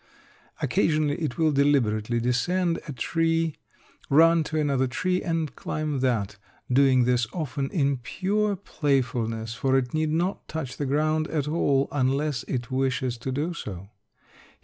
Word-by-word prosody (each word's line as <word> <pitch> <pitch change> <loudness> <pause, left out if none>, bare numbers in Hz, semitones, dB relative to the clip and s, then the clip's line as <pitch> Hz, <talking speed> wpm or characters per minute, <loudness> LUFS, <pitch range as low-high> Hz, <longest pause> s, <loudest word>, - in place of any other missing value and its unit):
Occasionally 155 -1 +1
it 150 -6 -2
will 160 -1 +3
deliberately 120 -6 +2
descend 165 +9 0
a - - -4
tree, 165 +4 0 0.5
run 165 +3 +5
to 155 0 -2
another 140 -3 +1
tree 180 +9 -1
and 165 -3 -2
climb 150 -2 -3
that; 110 -6 0 0.4
doing 130 -1 +5
this 120 -1 +2
often 140 -4 -3
in 140 -5 +1
pure 200 - -1
playfulness; 120 - -1
for 130 +3 +1
it 125 -2 -1
need 155 0 +1
not 170 +5 -1
touch 155 -5 -5
the 145 - -2
ground 155 +3 +1
at 150 -3 -2
all, 140 -3 +2
unless 140 0 0
it 125 0 -3
wishes 130 -1 0
to 130 +3 -4
do 150 +6 -2
so. 100 - -7
140 Hz, 145 wpm, -26 LUFS, 125-160 Hz, 0.5 s, run